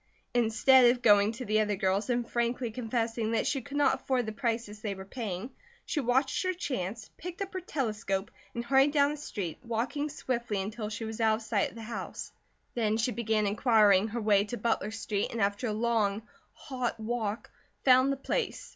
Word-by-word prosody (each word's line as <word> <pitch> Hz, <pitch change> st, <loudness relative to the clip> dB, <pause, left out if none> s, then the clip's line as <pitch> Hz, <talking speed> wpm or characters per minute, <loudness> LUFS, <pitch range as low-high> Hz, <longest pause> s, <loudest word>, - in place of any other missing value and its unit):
Instead 245 Hz, +2 st, +5 dB
of 245 Hz, 0 st, 0 dB
going 205 Hz, -1 st, +6 dB
to 250 Hz, +3 st, -7 dB
the 215 Hz, +1 st, +2 dB
other 210 Hz, -1 st, +1 dB
girls 190 Hz, +3 st, 0 dB
and 240 Hz, -1 st, 0 dB
frankly 235 Hz, 0 st, -1 dB
confessing 225 Hz, -1 st, -2 dB
that 225 Hz, -, +1 dB
she 270 Hz, -, 0 dB
could 285 Hz, +4 st, -6 dB
not 290 Hz, -, +4 dB
afford 255 Hz, -3 st, 0 dB
the 220 Hz, -, -3 dB
prices 225 Hz, -2 st, -3 dB
they 205 Hz, -3 st, -3 dB
were 190 Hz, 0 st, -9 dB
paying, 215 Hz, +1 st, -5 dB, 0.3 s
she 320 Hz, -, -1 dB
watched 265 Hz, +1 st, +1 dB
her 370 Hz, 0 st, 0 dB
chance, 225 Hz, -, -4 dB
picked 355 Hz, +1 st, -7 dB
up 395 Hz, -1 st, -4 dB
her 370 Hz, -, -3 dB
telescope 215 Hz, -, -2 dB, 0.2 s
and 235 Hz, 0 st, -3 dB
hurried 270 Hz, +3 st, +4 dB
down 285 Hz, -1 st, +3 dB
the 300 Hz, -, -5 dB
street, 200 Hz, -, -5 dB
walking 250 Hz, +6 st, -2 dB
swiftly 240 Hz, -7 st, -2 dB
until 210 Hz, +2 st, -4 dB
she 220 Hz, +1 st, -5 dB
was 220 Hz, +1 st, -5 dB
out 220 Hz, -1 st, +4 dB
of 220 Hz, -, -7 dB
sight 220 Hz, -2 st, 0 dB
of -, -, -17 dB
the 230 Hz, -, -8 dB
house. 230 Hz, +1 st, -6 dB, 0.4 s
Then 220 Hz, -2 st, +1 dB
she 230 Hz, +2 st, +1 dB
began 220 Hz, -3 st, 0 dB
inquiring 210 Hz, -2 st, +4 dB
her 230 Hz, +2 st, -4 dB
way 205 Hz, -2 st, +4 dB
to 240 Hz, +3 st, -5 dB
Butler 230 Hz, -3 st, 0 dB
Street 215 Hz, -2 st, -2 dB
and 235 Hz, -, -4 dB
after 205 Hz, +4 st, 0 dB
a -, -, -1 dB
long, 215 Hz, -2 st, 0 dB, 0.3 s
hot 255 Hz, -4 st, -4 dB
walk, 220 Hz, -1 st, -3 dB, 0.3 s
found 260 Hz, +1 st, +6 dB
the 275 Hz, -, -1 dB
place. 460 Hz, -, -2 dB
230 Hz, 200 wpm, -30 LUFS, 210-255 Hz, 0.4 s, going